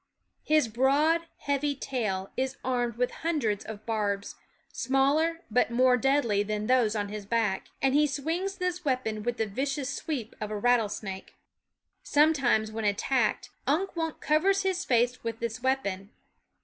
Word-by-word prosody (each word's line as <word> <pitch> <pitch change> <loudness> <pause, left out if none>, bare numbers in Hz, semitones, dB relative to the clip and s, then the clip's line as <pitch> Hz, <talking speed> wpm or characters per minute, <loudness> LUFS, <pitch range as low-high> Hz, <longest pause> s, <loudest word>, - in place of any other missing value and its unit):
His 305 -4 +3
broad, 290 +8 +2
heavy 285 0 0
tail 210 -8 -3
is 265 +1 -2
armed 245 -3 0
with 250 +1 0
hundreds 285 -12 0
of 215 -2 -9
barbs, 205 -3 -1 0.4
smaller 300 +6 +1
but 250 +1 +3
more 250 +1 +4
deadly 250 -5 +2
than 210 0 -2
those 240 -3 +3
on 205 -1 -2
his 210 0 -5
back; 220 -4 0 0.2
and 270 -1 +3
he 300 +1 +4
6 280 0 -4
swings 365 +5 -1
this 360 -1 -2
weapon 250 -6 -1
with 240 +2 -2
the 220 - +1
vicious 275 +5 -2
sweep 270 -7 -4
of 210 - -3
a 215 - -3
rattlesnake. 210 -4 0 0.7
Sometimes, 275 -8 +3
when 220 0 -4
attacked, 215 +3 0 0.2
Unk 350 +8 +1
Wunk 325 -2 -3
covers 385 +6 +2
his 375 -1 0
face 245 -3 +1
with 230 -1 -4
this 235 +1 -4
weapon. 200 -7 -1
250 Hz, 155 wpm, -28 LUFS, 215-295 Hz, 0.7 s, more